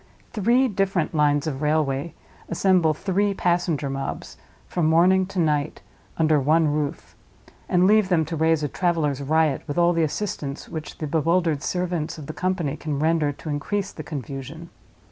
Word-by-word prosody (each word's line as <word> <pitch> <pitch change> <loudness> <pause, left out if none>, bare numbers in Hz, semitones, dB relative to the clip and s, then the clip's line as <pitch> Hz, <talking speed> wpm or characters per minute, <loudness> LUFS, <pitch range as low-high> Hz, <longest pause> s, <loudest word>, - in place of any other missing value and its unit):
Three 240 +5 +3
different 195 -6 -1
lines 145 -2 +2
of 145 -3 -3
railway 150 0 0 0.3
assemble 170 -3 +2
three 200 +3 0
passenger 175 -5 0
mobs, 135 0 -5 0.3
from 170 -3 -1
morning 180 +3 +4
to 195 - -9
night, 150 -3 0 0.3
under 155 -2 +3
one 155 +4 +3
roof; 150 +1 -4 0.5
and 180 -1 +3
leave 210 -1 +4
them 165 -4 +2
to 165 +2 -4
raise 160 0 +2
a - - +1
traveler's 155 -4 0
riot, 155 0 +1
with 145 - -4
all 175 0 +4
the 165 - +1
assistance 155 -3 -3
which 160 -2 -7
the 155 - -4
bewildered 160 0 +1
servants 175 -2 -2
of 150 - -8
the 155 - -6
company 180 -6 -1
can 150 -3 -3
render 155 0 +1
to 150 +2 -9
increase 190 +7 -2
the - - -8
confusion. 145 +2 -7
160 Hz, 165 wpm, -24 LUFS, 150-180 Hz, 0.5 s, morning